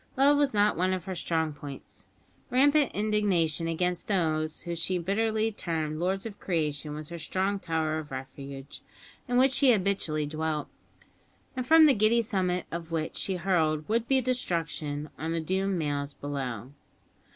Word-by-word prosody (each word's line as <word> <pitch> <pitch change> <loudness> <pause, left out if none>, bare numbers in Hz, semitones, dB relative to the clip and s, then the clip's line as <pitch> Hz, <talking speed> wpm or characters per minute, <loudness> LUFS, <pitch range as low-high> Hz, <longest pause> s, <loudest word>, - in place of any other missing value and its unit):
Love 280 +2 +6
was 285 -1 +3
not 210 0 +3
one 185 +2 +1
of 185 -2 -3
her 190 - -4
strong 160 -3 -1
points. 145 -1 -9 0.4
Rampant 285 +3 +4
indignation 195 -7 +1
against 175 +1 -1
those 155 -5 0
whom 170 - -4
she 170 +2 -1
bitterly 220 +5 0
termed 160 -6 -3
"lords 190 +4 -1
of 215 -3 -7
creation" 150 -4 -2
was 155 0 -7
her 170 0 -6
strong 190 +5 -1
tower 160 -3 -1
of 150 -1 -8
refuge, 135 +1 -8 0.5
in 245 0 +1
which 260 +1 +5
she 270 -1 +5
habitually 190 -7 +1
dwelt, 155 0 -2 0.9
and 255 -1 -3
from 320 +1 +8
the 290 - +6
giddy 225 +2 +3
summit 185 -5 -1
of 170 0 -5
which 160 -1 -2
she 190 - -2
hurled 160 -4 +1
would 230 +2 0
be 270 -1 +4
destruction 165 - -2
on 160 +1 -2
the 165 - 0
doomed 190 +3 0
males 145 -2 -2
below. 130 -4 -4
170 Hz, 160 wpm, -28 LUFS, 155-210 Hz, 0.9 s, from